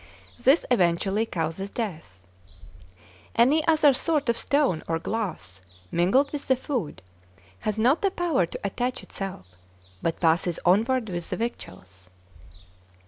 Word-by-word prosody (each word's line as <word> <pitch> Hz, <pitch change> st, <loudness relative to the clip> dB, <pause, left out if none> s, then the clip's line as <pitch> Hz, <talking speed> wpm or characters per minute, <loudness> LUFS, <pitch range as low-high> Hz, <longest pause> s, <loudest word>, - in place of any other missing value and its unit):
This 270 Hz, +7 st, +4 dB
eventually 195 Hz, +1 st, +2 dB
causes 165 Hz, +3 st, -3 dB
death. 180 Hz, -, -5 dB, 1.2 s
Any 275 Hz, +7 st, +4 dB
other 310 Hz, -3 st, +5 dB
sort 295 Hz, -1 st, 0 dB
of 235 Hz, -, +2 dB
stone 280 Hz, -, +1 dB
or 165 Hz, -, 0 dB
glass 165 Hz, -, -4 dB, 0.3 s
mingled 195 Hz, +12 st, +2 dB
with 290 Hz, -2 st, -5 dB
the 260 Hz, -, +4 dB
food 235 Hz, -, -4 dB, 0.6 s
has 215 Hz, 0 st, -2 dB
not 250 Hz, +8 st, +3 dB
the 395 Hz, -, +3 dB
power 340 Hz, -, 0 dB
to -, -, -7 dB
attach 245 Hz, +5 st, -2 dB
itself, 195 Hz, -, -6 dB, 0.6 s
but 165 Hz, -, -2 dB
passes 170 Hz, 0 st, +2 dB
onward 225 Hz, +5 st, +2 dB
with 175 Hz, -2 st, -4 dB
the -, -, -3 dB
victuals. 95 Hz, -, -7 dB
215 Hz, 130 wpm, -25 LUFS, 170-260 Hz, 1.2 s, other